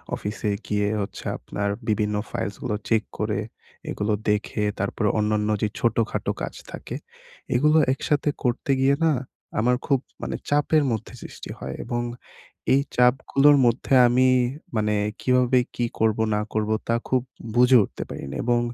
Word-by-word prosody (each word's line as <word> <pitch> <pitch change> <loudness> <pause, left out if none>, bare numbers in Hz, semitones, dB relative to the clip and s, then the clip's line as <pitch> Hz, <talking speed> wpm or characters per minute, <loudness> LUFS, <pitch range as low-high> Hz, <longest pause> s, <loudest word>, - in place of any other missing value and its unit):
অফিসে 105 +1 -3 0.2
গিয়ে 105 -1 +1
হচ্ছে 100 - -6
আপনার 100 0 -3 0.2
বিভিন্ন 105 -1 +1 0.2
ফাইলসগুলো 105 +3 -3
চেক 110 -1 +3
করে, 105 -1 -1 0.5
এগুলো 105 +1 -1 0.2
দেখে, 105 0 0 0.2
তারপর 100 +3 -2
অন্যান্য 105 0 +1
যে 110 - +2
ছোটখাটো 115 -1 0
কাজ - - -4 0.2
থাকে। - - -7 0.6
এগুলো 150 +5 +4 0.2
একসাথে 145 +2 0
করতে 125 +2 0
গিয়ে 135 +1 +4
না? 160 - +4 0.5
আমার 125 +3 +3
খুব 135 -3 +2 0.2
মানে - - -3
চাপের 150 +1 +3
মধ্যে 110 -3 -4
সৃষ্টি - - -9
হয়। - - -5
এবং 120 0 -2 0.7
এই 140 - +5
চাপগুলোর 135 +3 +4
মধ্যে 120 +3 +1
আমি 130 +2 +4 0.5
মানে 105 -1 +1 0.3
কিভাবে 125 0 +3 0.2
কি 120 - 0
করবো, 110 0 +2
না 105 - +1
করবো? 110 0 0
তা 115 - +2
খুব 130 -1 +3 0.3
বুঝে 125 +1 +7
উঠতে - - -6
পারি - - -6
না। - - -5
এবং 120 0 +2
115 Hz, 145 wpm, -24 LUFS, 105-130 Hz, 0.7 s, বুঝে